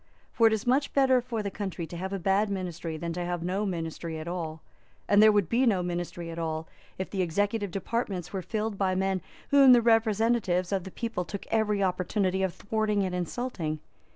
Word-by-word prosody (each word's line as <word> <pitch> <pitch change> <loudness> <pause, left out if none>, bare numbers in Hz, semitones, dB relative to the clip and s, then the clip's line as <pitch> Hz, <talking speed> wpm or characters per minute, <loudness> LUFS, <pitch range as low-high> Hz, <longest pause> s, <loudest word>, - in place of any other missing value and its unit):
For 230 - +5
it 220 - +3
is 220 +2 -2
much 265 +4 +2
better 260 -2 +4
for 235 -3 -3
the 200 - -3
country 190 -4 -4
to 160 - -9
have 190 +3 -4
a 195 - -1
bad 195 +3 +2
ministry 175 -4 -4
than 170 +1 -4
to 175 +1 -3
have 175 -1 -3
no 195 +4 -1
ministry 165 -2 -4
at 155 +1 -7
all, 160 -3 -4 0.4
and 205 0 +5
there 215 0 +8
would 205 -4 +2
be 245 +8 +2
no 190 -5 +2
ministry 175 -1 -4
at 165 - -6
all 160 -1 -3 0.3
if 190 - -4
the 195 - -1
executive 205 +4 0
departments 195 -2 -3
were 190 - -2
filled 215 +1 -3
by 190 -2 +1
men 190 0 0 0.3
whom 275 -2 +8
the 240 - +6
representatives 220 -5 +2
of 195 -2 -1
the - - -6
people 230 -5 -3
took 200 +3 -7
every 210 -2 +2
opportunity 185 +1 0
of 190 -1 +1
thwarting 210 -1 0
and 185 -1 -2
insulting. 180 -3 -3
195 Hz, 210 wpm, -28 LUFS, 175-220 Hz, 0.4 s, there